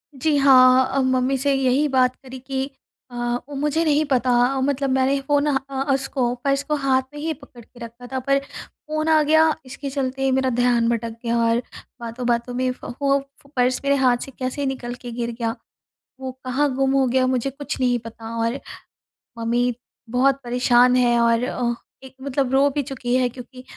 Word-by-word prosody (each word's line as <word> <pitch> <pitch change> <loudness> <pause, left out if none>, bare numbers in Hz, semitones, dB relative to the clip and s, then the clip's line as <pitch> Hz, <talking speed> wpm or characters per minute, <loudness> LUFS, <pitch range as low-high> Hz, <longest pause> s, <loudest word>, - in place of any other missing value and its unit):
जी, 295 +3 +1
हाँ 260 -2 +6
अ, 275 - +3
मम्मी 260 +1 +1
से 280 +1 +1
यही 270 +2 +2
बात 255 -1 +2
करी 260 -1 -11
कि 265 +1 -3 0.4
अ, - - -10 0.3
वो 285 - -7
मुझे 300 +3 0
नहीं 305 0 +3
पता 255 -2 +1 0.2
अ, - - -1
मतलब 275 0 0
मैंने 265 +1 +2
फ़ोन 285 +1 +1
अ 285 - +1
अ, 270 0 -2
उसको 265 -2 -1
पर्स 275 0 +1
को 300 +1 -1
हाथ 270 -2 +2
में 295 - -8
ही 320 +2 -2
पकड़ 280 -5 -15
के 245 - -19
रखा 235 +2 -12
था 260 - 0
पर 275 0 +4
फ़ोन 310 +2 -6
आ 310 -1 +5
गया 315 +1 +4
इसके 275 +2 -6
चलते 270 -1 -3
ही 265 - +2
मेरा 260 0 +2
ध्यान 240 -2 +3
भटक 230 -1 -2
गया 235 0 0
और 230 +1 +2 0.4
बातों-बातों 235 +1 -2
में 255 0 0
फ़ - - -11
फ़ो 275 +2 +1 0.4
पर्स 250 0 +1
मेरे 280 0 +3
हाथ 255 -3 +3
से - - -10
कैसे 260 +2 -2
निकल 250 -2 -3
के 245 -1 -7
गिर 235 0 -3
गया, 230 0 -3 0.7
वो 260 -1 -5
कहाँ 275 +3 +1
गुम 270 0 +1
हो 270 -1 +3
गया 255 +1 +2
मुझे 255 +1 0
कुछ 280 +1 -6
नहीं 245 -1 +2
पता 230 0 -9
और 235 +4 -2 0.8
मम्मी 240 +2 0 0.4
बहुत 265 +3 +2
परेशान 245 0 +3
है 240 -1 +3
और 235 0 +3
अ, 245 -2 -1 0.3
एक 265 - -12
मतलब 270 -1 -1
रो 275 +1 +4
भी 285 +1 -1
चुकी 250 -2 -3
है 255 -1 +2
क्योंकि 255 +1 -11
260 Hz, 195 wpm, -22 LUFS, 245-275 Hz, 0.8 s, हाँ